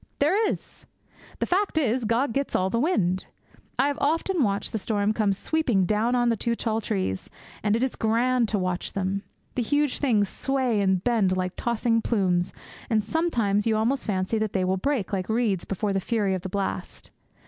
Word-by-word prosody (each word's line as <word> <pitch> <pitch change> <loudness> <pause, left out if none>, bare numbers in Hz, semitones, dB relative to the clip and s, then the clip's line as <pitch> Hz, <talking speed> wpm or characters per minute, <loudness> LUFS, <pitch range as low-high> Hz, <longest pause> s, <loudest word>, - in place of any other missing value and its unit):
There 390 +10 +3
is! - - -7 0.5
The - - 0
fact 385 -1 0
is, 255 -5 +1
Gog 230 +3 +1
gets 275 +2 -1
all 185 +1 +1
the 230 - +1
wind. 190 - +1 0.5
I 270 - +3
have 285 +1 -1
often 330 +4 +1
watched 200 -4 0
the 220 - -2
storm 205 0 0
come 215 -2 +1
sweeping 230 - +1
down 215 +5 +1
on 240 -1 +3
the 230 - +2
two 235 +2 -1
tall 225 -1 -1
trees, 190 - -2 0.3
and 210 0 +2
it 230 - +1
is 260 - -1
grand 235 +1 +2
to 215 - +1
watch 185 -1 -2
them. 195 0 -1 0.3
The 250 - -1
huge 290 +3 +1
things 220 -8 +2
sway 255 -2 0
and 190 -2 +2
bend 210 -6 +2
like 185 0 -2
tossing 235 -1 +1
plumes, 185 -6 +1 0.4
and 220 -2 +2
sometimes 230 -8 +1
you 220 -1 +2
almost 240 +5 0
fancy 195 +2 0
that 215 -2 -1
they 185 -2 +1
will 185 +1 +1
break 230 -1 -1
like 185 0 -2
reeds 220 -5 +1
before 200 +1 -1
the 195 - +1
fury 205 -1 0
of 185 - -2
the 190 - -5
blast. 180 - -4
220 Hz, 195 wpm, -26 LUFS, 195-250 Hz, 0.5 s, There